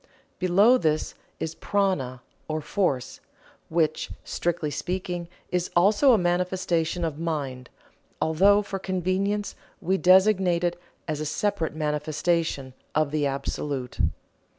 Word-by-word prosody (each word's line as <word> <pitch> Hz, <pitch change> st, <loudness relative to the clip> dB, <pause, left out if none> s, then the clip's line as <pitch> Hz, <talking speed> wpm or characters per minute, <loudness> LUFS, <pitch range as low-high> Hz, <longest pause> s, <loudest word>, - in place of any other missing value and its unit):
Below 200 Hz, +8 st, +5 dB
this 155 Hz, -4 st, 0 dB, 0.3 s
is 160 Hz, -, -3 dB
Prana 160 Hz, -10 st, -1 dB, 0.2 s
or 155 Hz, 0 st, -2 dB
Force, 150 Hz, -5 st, -1 dB, 0.5 s
which, 160 Hz, -1 st, 0 dB
strictly 170 Hz, -3 st, -2 dB
speaking, 175 Hz, 0 st, -3 dB, 0.2 s
is 180 Hz, -1 st, 0 dB
also 205 Hz, +10 st, +5 dB
a -, -, +5 dB
manifestation 175 Hz, -2 st, 0 dB
of 155 Hz, -2 st, -4 dB
mind, 140 Hz, -7 st, -3 dB, 0.5 s
although 200 Hz, +6 st, +4 dB
for 195 Hz, -1 st, -5 dB
convenience 190 Hz, +2 st, -1 dB, 0.3 s
we 190 Hz, +3 st, 0 dB
designate 185 Hz, -2 st, +4 dB
it 175 Hz, 0 st, -1 dB, 0.3 s
as 155 Hz, -2 st, -2 dB
a 155 Hz, -, -3 dB
separate 195 Hz, -1 st, -1 dB
manifestation 150 Hz, -2 st, -1 dB, 0.2 s
of 155 Hz, -2 st, +2 dB
the 150 Hz, -2 st, +1 dB
Absolute. 140 Hz, -1 st, -4 dB
170 Hz, 115 wpm, -26 LUFS, 155-190 Hz, 0.5 s, Below